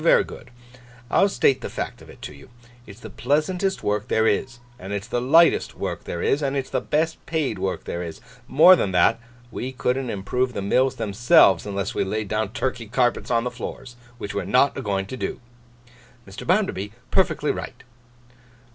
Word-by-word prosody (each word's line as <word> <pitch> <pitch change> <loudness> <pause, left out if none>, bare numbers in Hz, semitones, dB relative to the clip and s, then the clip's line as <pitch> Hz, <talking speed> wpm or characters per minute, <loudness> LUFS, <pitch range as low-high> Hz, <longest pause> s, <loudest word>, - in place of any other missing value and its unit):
Very - - +5
good. - - -11 0.6
I'll 200 - +4
state 135 -8 +2
the - - -5
fact - - -5
of - - -15
it - - -14
to - - -7
you. 70 +8 -15 0.4
It's 105 +3 -13
the 110 - -9
pleasantest 165 - -1
work 105 +2 -1
there 110 -2 +2
is, 120 +4 0 0.2
and 95 +2 -6
it's 100 0 -3
the 120 +1 -2
lightest 165 +7 +4
work - - -4
there 85 - -4
is, 145 - +1
and 140 -1 -1
it's 135 - -4
the - - 0
best 160 +2 -1
paid 160 -4 -1
work 95 -1 -2
there 85 - -4
is. 85 -2 -7 0.3
More 180 +6 +7
than 100 - -1
that, 115 +5 +4 0.3
we 130 - -4
couldn't 130 0 -1
improve 125 +5 -1
the 100 - -3
mills 130 +6 +2
themselves, 100 -4 +4
unless 100 -1 -3
we - - 0
laid 105 +1 -3
down 110 -1 -1
Turkey 120 -1 -3
carpets 120 +2 0
on 115 -1 +2
the 125 - -3
floors. 125 +1 -8 0.2
Which 100 - -6
we're 100 - -2
not 130 +8 +3
a - - -4
going 100 -4 -1
to 130 - -7
do.' - - -4 0.9
'Mr. 95 - -9
Bounderby, 165 - 0 0.2
perfectly - - +2
right. - - -7
120 Hz, 190 wpm, -23 LUFS, 100-135 Hz, 0.9 s, More